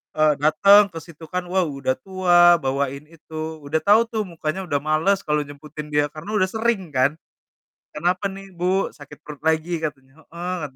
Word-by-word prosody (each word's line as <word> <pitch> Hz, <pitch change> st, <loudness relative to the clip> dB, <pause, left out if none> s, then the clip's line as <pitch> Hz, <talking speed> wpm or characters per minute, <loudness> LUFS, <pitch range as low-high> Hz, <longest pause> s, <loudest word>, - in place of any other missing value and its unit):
Eee, 155 Hz, -1 st, +3 dB
dateng 200 Hz, +7 st, +6 dB
ke 165 Hz, -, -7 dB
situ 165 Hz, -1 st, -15 dB
kan, 180 Hz, 0 st, -2 dB
waw, 180 Hz, -1 st, +1 dB
udah 135 Hz, -2 st, -2 dB
tua, 175 Hz, -1 st, +5 dB
bawain 140 Hz, +1 st, -2 dB
itu. 160 Hz, -1 st, -7 dB
Udah 155 Hz, +3 st, -1 dB
tau 210 Hz, +3 st, +5 dB
tuh, 220 Hz, -2 st, -2 dB
mukanya 165 Hz, +2 st, -4 dB
udah 145 Hz, -2 st, 0 dB
males 160 Hz, +6 st, +2 dB
kalo 150 Hz, 0 st, +1 dB
jemputin 150 Hz, +1 st, -9 dB
dia, 145 Hz, 0 st, +2 dB
karena 155 Hz, +8 st, -8 dB
udah 185 Hz, -, +3 dB
sering 220 Hz, -5 st, -1 dB
kan. 135 Hz, +4 st, +2 dB, 0.8 s
"Kenapa 180 Hz, +5 st, 0 dB
nih 195 Hz, 0 st, -11 dB
Bu, 185 Hz, +3 st, 0 dB
sakit 145 Hz, -1 st, -13 dB
perut 150 Hz, -2 st, -10 dB
lagi?" 160 Hz, +1 st, +1 dB
katanya, 135 Hz, -3 st, -6 dB
"heeh," 175 Hz, +2 st, -5 dB
katanya. 135 Hz, -, -22 dB
160 Hz, 180 wpm, -22 LUFS, 150-185 Hz, 0.8 s, dateng